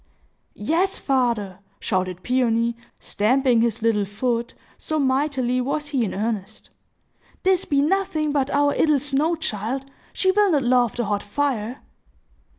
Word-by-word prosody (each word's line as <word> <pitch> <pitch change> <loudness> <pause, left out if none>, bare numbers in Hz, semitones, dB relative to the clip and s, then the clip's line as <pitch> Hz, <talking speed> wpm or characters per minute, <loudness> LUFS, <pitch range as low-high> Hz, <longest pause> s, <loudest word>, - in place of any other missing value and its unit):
"Yes, 335 - 0
father," 235 -8 0 0.2
shouted 185 -2 -2
Peony, 235 -2 +1 0.2
stamping 245 +2 +2
his 230 -1 0
little 220 -3 +2
foot, 235 +4 -2 0.2
so 310 - -3
mightily 260 -2 +1
was 295 +3 -2
he 270 -5 0
in 210 - -3
earnest, 210 -1 -4 0.7
"this 375 -1 +2
be 280 -1 +2
nothing 315 -3 0
but 280 -2 0
our 285 0 +2
'ittle 305 -2 +3
snow 290 +4 0
child! 260 -3 -3 0.3
She 375 - +2
will 410 +1 +3
not 285 -3 +2
love 245 -2 +2
the 240 - -1
hot 205 0 -1
fire!" 245 +1 -2
255 Hz, 140 wpm, -23 LUFS, 225-290 Hz, 0.7 s, ittle